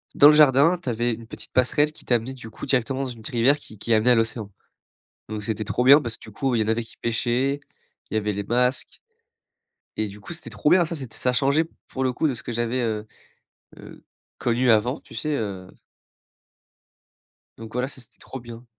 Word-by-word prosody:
dans 145 - +8
le - - +6
jardin, 150 +4 +5
tu 130 - -4
avais 120 +1 0
une 115 0 -9
petite - - -10
passerelle 145 +4 +3
qui - - -16
t'amenait, 120 +2 0
du 120 -4 -10
coup, - - -8
directement 135 0 0
dans 130 - -3
une 115 -2 -11
rivière 130 +5 +3
qui 110 - -14
qui 115 +3 0
amenait 110 +3 +4
à - - +6
l'océan. 115 -2 -1 0.8
Donc 105 -1 -4
c'était 110 -1 -2
trop 125 +2 0
bien 140 +4 +8
parce 115 -2 -5
que - - -49
du 110 - -11
coup, 130 +4 -1
il 110 - +2
y - - +3
en - - -6
avait 115 +1 +1
qui 115 - -15
pêchaient, 120 +5 0 0.5
il - - -2
y - - +4
avait 105 -1 -1
les 100 +1 -3
masques 125 +4 +1 1.1
et 110 -1 0
du 100 +1 -11
coup, 170 - -8
c'était 165 - -7
trop 150 - 0
bien. 180 -2 +5
Ça, 170 - -4
c'était 130 -6 -7
ça 125 0 +1
changeait, 140 +5 +2 0.2
pour 130 - -3
le 130 -1 +1
coup, 155 - +1
de 135 - 0
ce 110 - -6
que - - -5
j'avais, 120 +2 -1
heu 110 -2 -2 0.7
heu, - - -13 0.3
connu 120 +1 +2
avant, 120 +6 +2
tu - - -16
sais, 150 +7 -3
heu 95 -5 -4 1.9
Donc 110 0 -10
voilà, 125 +1 -1
ça 135 -2 -9
c'était 115 - -17
trop 130 - -9
bien. 120 0 -11
120 Hz, 225 wpm, -24 LUFS, 110-135 Hz, 1.9 s, dans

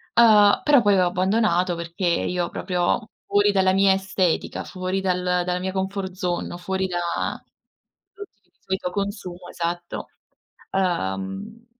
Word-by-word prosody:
uhm, 210 -3 +6
però 290 -4 +5
poi 205 -3 +4
ho 180 - +4
abbandonato 185 -1 +1
perché 170 +2 -4
io 175 +1 0
proprio 180 +4 -1 0.2
fuori 205 0 +3
dalla 190 -1 +3
mia 195 0 +5
estetica, 190 -2 -1
fuori 185 0 -3
dal 180 -1 0 0.2
dalla 180 0 -1
mia 190 +1 -3
comfort 190 0 -3
zone, 180 -2 -3
o - - -6
fuori 190 +1 -2
da 175 -1 -2 1.1
prodotti 405 - -12
che - - -38
di - - -49
solito 190 -1 -3
consumo 185 -3 -5
esatto. 175 0 -4 0.7
Uhm, 95 - -2
185 Hz, 140 wpm, -23 LUFS, 175-200 Hz, 1.1 s, uhm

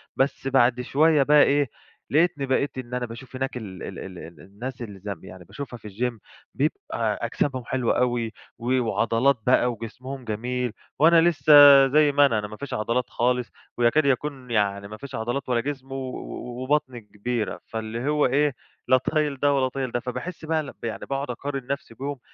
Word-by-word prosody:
بس 135 0 0
بعد 125 -2 +3
شوية 150 +3 +3
بقى 150 +1 +6
إيه 145 -2 +2 0.4
لقتني 160 -1 +2
بقيت 135 +1 0
إن 125 -1 -7
أنا 125 0 -1
باشوف 120 +3 -10
هناك 135 0 -3
ال 100 -6 -8
ال - - -7
ال 95 -2 -8 0.2
الناس 120 - -8
اللي 105 -4 -7
زم 100 -3 -6
يعني 95 -1 -11
باشوفها 135 - -8
في 110 - -20
الجيم 115 +3 -3 0.4
بيبقى - - -1
أجسامهم 130 -4 -2
حلوة 130 -1 0
أوي 120 -3 0 0.3
و 125 +2 +1
وعضلات 115 +3 +2
بقى 125 -1 +4
وجسمهم 125 +4 -8
جميل 120 +2 -2 0.3
وأنا 165 +2 +6
لسه 155 -3 +4 0.3
زي 150 +2 +4
ما 145 0 +5
أنا، 115 -6 +2
أنا 105 - -4
ما 105 +1 -10
فيش 140 +3 -6
عضلات 120 +3 -1
خالص 125 0 0 0.3
ويكاد 120 +6 +3
يكون 135 -2 -1
يعني 100 -2 0
ما 105 +1 -9
فيش 140 +2 -8
عضلات 120 +4 -3
ولا 120 -2 +2
جسم 135 0 -6
و - - -4 0.7
وبطني 130 -3 0
كبيرة 105 +2 -3
فاللي 115 +4 -4
هو 150 0 +3
إيه 145 +1 +2 0.3
لا 130 - +6
طايل 145 +2 -1
ده 145 +1 +3
ولا 135 -2 +2
طايل 130 -1 -3
ده. 120 - 0
فباحس 125 +8 -6
بقى 155 -3 -1
يعني 115 -2 -4
باقعد 140 0 -3
أقارن 135 +1 -5
نفسي 140 -3 -4
بيهم 140 +3 -5
130 Hz, 180 wpm, -25 LUFS, 115-140 Hz, 0.7 s, بقى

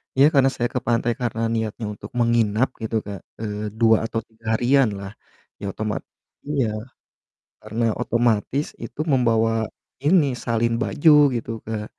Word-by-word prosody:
Iya, 135 +1 +6
karena 135 -2 +5
saya 120 -1 -1
ke - - +2
pantai 120 0 +2
karena 115 -2 -2
niatnya 110 0 -2
untuk 105 - -11
menginap 115 0 +2
gitu 110 0 -3
Kak, 100 -1 -6 0.2
eee, 105 -2 -3 0.2
2 110 -1 +6
atau 115 - -2
3 115 0 -26
harian 125 +3 +4
lah, 100 0 -7 0.5
ya - - -12
otomat 110 -2 -3 0.5
iya, 145 -4 +1 1.0
karena 110 +2 -3 0.2
otomatis 120 +4 +1 0.2
itu - - -9
membawa, 115 -3 +3 0.5
ini, 165 0 +5 0.2
salin 115 0 +1
baju 130 - +3 0.3
gitu 115 -1 -4 0.2
Kak. 110 -1 -3
115 Hz, 145 wpm, -23 LUFS, 110-125 Hz, 1.0 s, Iya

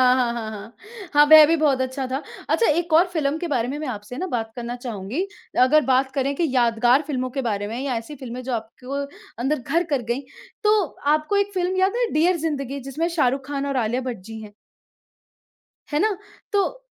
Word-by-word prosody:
हाँ, 245 -2 +1
हाँ, 225 -2 -4
हाँ। 215 +2 -9 0.4
हाँ, 295 0 +7
वह 310 0 +10
भी 330 - +3
बहुत 280 -4 +2
अच्छा 260 +1 -2
था। 260 - -2 0.3
अच्छा 465 - +3
एक 340 +2 +1
और 340 +4 +6
फ़िल्म 300 -2 0
के 345 - -3
बारे 245 -6 0
में 275 +3 -3
मैं 305 - -4
आपसे 215 +1 -6
ना 370 - -2
बात 225 -7 -3
करना 240 0 -4
चाहूँगी। 230 - -3 0.3
अगर 290 +5 +6
बात 265 0 +2
करें 275 0 0
कि 335 +1 +1
यादगार 240 +2 +4
फ़िल्मों 255 -3 -2
के - - +1
बारे 205 0 -2
में। 230 +3 -4
या 265 -2 -2
ऐसी 230 +7 -7
फ़िल्में 255 -2 -7
जो 255 0 -3
आपको 250 +5 -4 0.4
अंदर 270 +3 0
घर 335 +8 0
कर 280 -4 +1
गईं। 250 +4 0 0.4
तो 425 0 +4 0.3
आपको 310 +7 -1
एक 405 0 0
फ़िल्म 365 0 0
याद 380 +4 +2
है 480 - +2
डियर 340 +4 +3
ज़िंदगी? 280 -4 -3
जिसमें 275 +6 -2
शाहरुख 270 -5 +1
खान 280 -1 -2
और 275 -1 -1
आलिया 240 +1 0
भट्ट 250 -3 -4
जी 225 0 -8
हैं। 210 -1 -11 1.4
है 295 - +1
ना? 425 0 +2 0.4
तो 410 +5 0
275 Hz, 210 wpm, -23 LUFS, 245-315 Hz, 1.4 s, वह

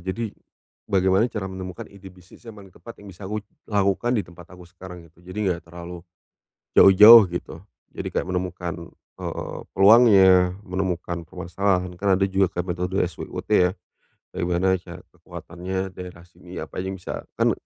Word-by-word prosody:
Jadi. 115 +2 -4 0.6
Bagaimana 95 +2 +2
cara 105 -5 -5
menemukan 95 -1 -7
ide 100 -1 -15
bisnis 90 +6 -19
yang 115 - -9
paling 100 -2 -14
tepat 115 +4 -14
yang 100 - -11
bisa 95 +1 -11
aku 105 +2 -4 0.2
lakukan 100 +3 0
di 110 - 0
tempat 85 -1 -15
aku 90 - -14
sekarang 90 -1 -11
gitu. 80 - -31
Jadi 90 +3 -10
enggak 90 -4 -2
terlalu 85 +1 -9 0.8
jauh-jauh 105 +3 +9
gitu. 85 - -6 0.3
Jadi - - -7
kayak - - -2
menemukan, 90 -2 -5 0.2
eee, - - -6
peluangnya, 95 -3 +6
menemukan 90 -3 -4
permasalahan. 90 +1 -2
Kan 100 +1 +1
ada 95 - 0
juga 95 -2 0
metode 90 +1 -2
SWOT 90 -2 -6
ya. 90 0 +3 0.6
Bagaimana 90 +1 0
cari 85 -1 -12
kekuatannya 95 +2 -7
daerah 90 -2 -10
sini, 90 - -14
apa - - -6
aja 95 - -4
bisa 90 - -8 0.2
kan - - +2
95 Hz, 155 wpm, -23 LUFS, 90-100 Hz, 0.8 s, jauh-jauh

